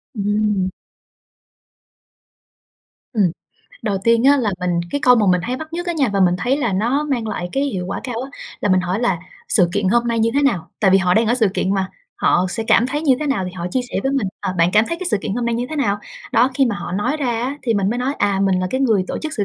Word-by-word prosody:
Ừm. 205 -2 0 2.4
Ừm, 215 -4 +2 0.6
đầu 200 -3 -1
tiên 230 +1 +3
á 285 +1 +6
là 230 -6 0
mình 175 -1 0
cái 285 - -1
câu 250 - +7
mà 215 -3 +2
mình 180 - +3
hay 250 +2 -2
bắt 315 +3 -8
nhất 350 +1 -4
á 345 - 0
nha 280 -7 +1
và 195 - +1
mình 180 -1 +4
thấy 250 +7 +1
là 240 -8 -1
nó 240 +10 +1
mang 255 -6 -2
lại 180 -4 -3
cái 275 - 0
hiệu 190 -10 -3
quả 195 - -4
cao 245 -3 -3
á, 270 +1 -6 0.3
là 205 - 0
mình 185 -1 +4
hỏi 180 +4 -2
là 195 -8 +1 0.3
"Sự 180 -4 +4
kiện 205 -2 0
hôm 235 +3 +2
nay 230 -1 0
như 225 +1 +2
thế 285 - +2
nào?", 195 - 0
tại 195 - +4
vì 195 - +6
họ 180 -1 +2
đang 225 +2 +3
ở 235 - +3
sự 225 -5 +3
kiện 195 +1 0
mà, 190 -1 -1 0.3
họ 180 +1 +2
sẽ 225 - -3
cảm 235 - +4
thấy 295 +3 -3
như 280 -5 +4
thế 300 - -1
nào 265 -10 0
thì 180 - -6
họ 175 -2 -5
chia 255 - 0
sẻ - - -3
với 270 +1 0
mình: 270 -7 0
"À, 195 -2 -2
bạn 170 +2 +4
cảm 215 +1 +5
thấy 335 - -2
cái 370 - -3
sự - - +3
kiện 205 - -3
hôm 240 -1 -2
nay 235 - 0
như 240 +2 -2
thế 310 - -4
nào?" 205 -8 +1 0.3
Đó, 245 +3 +4
khi 270 0 +3
mà 220 -4 -1
họ 175 - -6
nói 205 +10 0
ra 290 -4 -2 0.2
á 275 +4 -3
thì 230 -3 0
mình 200 0 +1
mới 240 - -2
nói: 265 +3 -1
"À, 200 -1 +1
mình 190 -2 +2
là 185 - 0
cái 260 - -1
người 220 -8 +2
tổ - - -3
chức 310 0 -4
sự 205 - -1
225 Hz, 280 wpm, -20 LUFS, 195-260 Hz, 2.4 s, câu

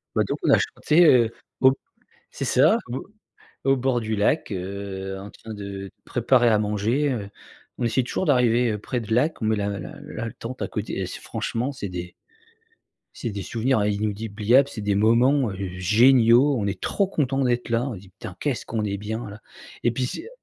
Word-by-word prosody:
Bah - - +3
donc - - -2
on - - +1
a - - +7
chanté, 170 +3 +3
heu, 120 -6 +5 0.3
au 130 0 +7
b - - -4 0.6
c'est - - -4
ça - - +4
au 130 - -4 0.6
au 135 0 +4
bord 130 -1 +1
du 110 -1 -2
lac, 110 +6 +1
heu, 95 0 -5
en 100 +2 -9
train 110 -1 -10
de 100 -1 -7
préparer 120 0 +3
à 105 -1 +3
manger, 110 +8 0
heu, 105 -5 -4 0.5
on 120 - 0
essaie 120 +2 +1
toujours 160 - -2
d'arriver, 125 -4 +3
heu, - - -2
près 120 +4 -3
de 110 -1 -3
lac, 140 +6 +1
met 110 0 +2
la 100 -1 -1
la 90 - -8
la 115 -1 -6
tente 125 +2 -8
à - - -1
côté. 105 -2 -4
Et 95 - -1
c'est - - -8
franchement 125 +5 -3
c'est 105 -7 -6
des 90 -1 -6 1.0
c'est 115 - -4
des 100 - -5
souvenirs 115 +2 0
inoubliables, 105 +5 +1
c'est 110 - -7
des 100 -1 0
moments, 120 +5 +3
heu, 95 0 -4
géniaux. 120 +6 +5
On 100 - -1
est 95 -1 -3
trop 200 -2 0
content 135 -7 -1
d'être 120 -1 0
là. 115 +3 +1
On 115 - -5
dit: 95 0 -13
«Putain, 100 -6 -8
qu'est-ce 140 -5 -2
qu'on 110 -2 -2
est 100 -1 -2
bien 110 +3 -5
là», 105 +2 -11 0.4
et 120 - +3
puis 125 +2 -1
c'est, 225 - -5
heu 460 - -10
115 Hz, 205 wpm, -24 LUFS, 100-125 Hz, 1.0 s, a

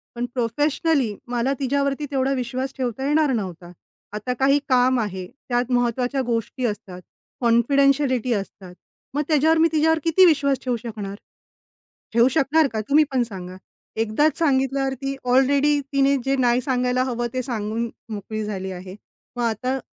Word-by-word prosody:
पण 240 - -2
प्रोफेशनली 275 +1 0
मला 245 +3 0
तिच्यावरती 280 +2 0
तेवढा 270 0 +1
विश्वास 255 +1 -3
ठेवता 260 +1 -2
येणार 295 -1 +3
नव्हता. 180 -5 -5 0.4
आता 210 +4 -3
काही 275 +2 +4
काम 255 0 +3
आहे. 190 -4 -3 0.2
त्यात 245 +1 0
महत्त्वाच्या 245 +2 0
गोष्टी 235 +2 -2
असतात, 205 -4 -5 0.4
कॉन्फिडेन्शियलिटी 255 +1 +3
असतात, 195 -3 -6 0.4
मग 290 - 0
त्याच्यावर 315 +1 +3
मी 325 +1 +5
तिच्यावर 320 +1 +2
किती 335 +3 +5
विश्वास 280 -5 +3
ठेवू 250 - 0
शकणार? 210 -4 -6 1.0
ठेवू 235 +2 +5
शकणार 310 +2 +3
का? 220 - -2
तुम्ही 300 +2 +5
पण 255 - +2
सांगा. 185 -5 -7 0.4
एकदाच 225 +8 +1
सांगितल्यावर 270 -3 +1
ती 275 0 -2
ऑलरेडी 275 +3 +3
तिने 275 0 +3
जे 270 0 +1
नाही 245 -1 +3
सांगायला 250 0 0
हवं, 240 -2 -2
ते 255 - -1
सांगून 230 -1 -3 0.2
मोकळी 215 +1 -4
झाली 190 -2 -4
आहे. 185 +1 -9 0.4
मग 245 - -2
आता 235 +3 -1
255 Hz, 150 wpm, -23 LUFS, 230-275 Hz, 1.0 s, मी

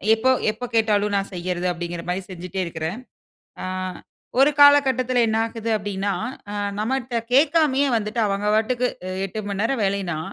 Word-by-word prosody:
எப்போ, 255 +4 +2 0.2
எப்ப 220 +3 -11
கேட்டாலும் 210 -2 +2
நான் 195 0 -1
செய்யிறது 180 0 -2
அப்பிடிங்கிற 175 -1 -4
மாரி 180 +2 -1
செஞ்சிட்டே 180 +1 -6
இருக்குறேன். 165 +5 -4 0.6
ஆ, - - -4 0.8
ஒரு 275 +2 +6
காலகட்டத்தில 260 -4 +5
என்ன 220 - 0
ஆகுது 230 0 -4
அப்பிடின்னா, 200 -1 -2 0.4
ஆ - - -4 0.2
நம்மட்ட 245 +1 -1
கேக்காமயே 285 0 +4
வந்துட்டு, 215 +2 -2
அவங்க 200 +1 -1
பாட்டுக்கு, 245 +3 +1 0.2
அ - - -4 0.2
8:00 210 +3 -6
மணி 200 0 -3
நேரம் 230 0 0
வேலைன்னா 195 -5 -1
215 Hz, 150 wpm, -23 LUFS, 190-250 Hz, 0.8 s, ஒரு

